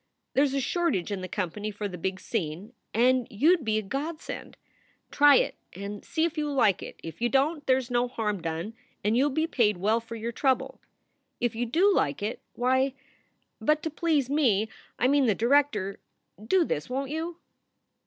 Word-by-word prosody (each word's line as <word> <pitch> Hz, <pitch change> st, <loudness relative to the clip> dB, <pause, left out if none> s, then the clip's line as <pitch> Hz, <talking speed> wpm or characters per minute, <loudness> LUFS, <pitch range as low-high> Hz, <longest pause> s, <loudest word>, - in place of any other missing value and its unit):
There 275 Hz, -, +4 dB
is 275 Hz, -1 st, 0 dB
a -, -, +2 dB
shortage 275 Hz, -, 0 dB
in 195 Hz, -2 st, -3 dB
the 185 Hz, -, -4 dB
company 205 Hz, +2 st, -3 dB
for 205 Hz, 0 st, -4 dB
the 185 Hz, -, -7 dB
big 185 Hz, +2 st, -3 dB
scene, 185 Hz, +2 st, -4 dB, 0.2 s
and 250 Hz, +2 st, +3 dB
you 295 Hz, -, +4 dB
d 340 Hz, -, -7 dB
be 220 Hz, -2 st, +1 dB
a 215 Hz, -, -1 dB
godsend. 295 Hz, +9 st, -5 dB, 0.5 s
Try 290 Hz, -1 st, +7 dB
it -, -, +2 dB, 0.2 s
and 200 Hz, +2 st, -7 dB
see 320 Hz, 0 st, 0 dB
if 335 Hz, -1 st, -2 dB
you 300 Hz, -1 st, -1 dB
like 220 Hz, -9 st, +3 dB
it. -, -, -9 dB
If 165 Hz, +6 st, -8 dB
you 240 Hz, -, +2 dB
don 280 Hz, +5 st, +2 dB
t, -, -, -22 dB
there 260 Hz, -1 st, +5 dB
s 255 Hz, -1 st, -5 dB
no 245 Hz, 0 st, +2 dB
harm 210 Hz, -5 st, -2 dB
done 165 Hz, +6 st, -4 dB, 0.3 s
and 210 Hz, +3 st, +2 dB
you 265 Hz, +4 st, +4 dB
ll -, -, 0 dB
be 315 Hz, +3 st, 0 dB
paid 220 Hz, -, +2 dB
well 215 Hz, +5 st, +2 dB
for 230 Hz, 0 st, -9 dB
your 230 Hz, +1 st, -4 dB
trouble. 260 Hz, +2 st, 0 dB, 0.6 s
If 240 Hz, -, 0 dB
you 240 Hz, +1 st, -1 dB
do 365 Hz, -, +4 dB
like 145 Hz, -, 0 dB
it, 215 Hz, -, -3 dB
why 260 Hz, +2 st, +2 dB, 0.6 s
But 305 Hz, +1 st, +1 dB
to 320 Hz, -, -2 dB
please 310 Hz, -4 st, +1 dB
me 235 Hz, -8 st, +2 dB, 0.3 s
I 250 Hz, -, +3 dB
mean 280 Hz, -1 st, +3 dB
the 215 Hz, -, +3 dB
director 235 Hz, -5 st, +2 dB, 0.4 s
do 350 Hz, +10 st, +3 dB
this, 150 Hz, -, -3 dB
won 270 Hz, +2 st, -1 dB
t -, -, -4 dB
you?" 330 Hz, +2 st, -4 dB
245 Hz, 205 wpm, -27 LUFS, 210-290 Hz, 0.6 s, Try